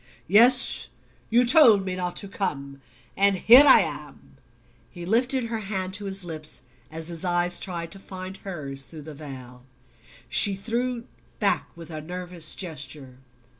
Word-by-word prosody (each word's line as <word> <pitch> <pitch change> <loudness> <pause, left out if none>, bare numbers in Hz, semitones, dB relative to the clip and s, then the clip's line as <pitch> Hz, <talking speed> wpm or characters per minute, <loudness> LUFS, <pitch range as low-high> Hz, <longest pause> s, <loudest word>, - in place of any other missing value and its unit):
"Yes; 240 +7 +4 0.4
you 240 +2 +3
told 235 -7 +6
me 185 - -3
not 180 -1 -4
to 200 - -6
come 140 -9 -5 0.3
and 200 0 +2
here 245 +9 +8
I 265 - +8
am." 150 -3 -8 0.5
He 175 -1 -10
lifted 245 +6 +1
her 230 -1 -4
hand 190 -3 -4
to 205 0 -3
his 195 -1 -4
lips 155 -5 -7 0.3
as 160 +1 -7
his 170 0 -5
eyes 175 0 +2
tried 170 -3 -5
to 195 - -12
find 185 0 -9
hers 140 -9 -4
through 155 -3 -11
the 155 +1 -10
veil. 130 -4 -11 0.6
She 200 +8 +5
drew 235 +3 -3 0.3
back - - 0
with 165 0 -11
a 155 -1 -6
nervous 175 0 -4
gesture. 140 -6 -5
180 Hz, 155 wpm, -24 LUFS, 155-205 Hz, 0.6 s, here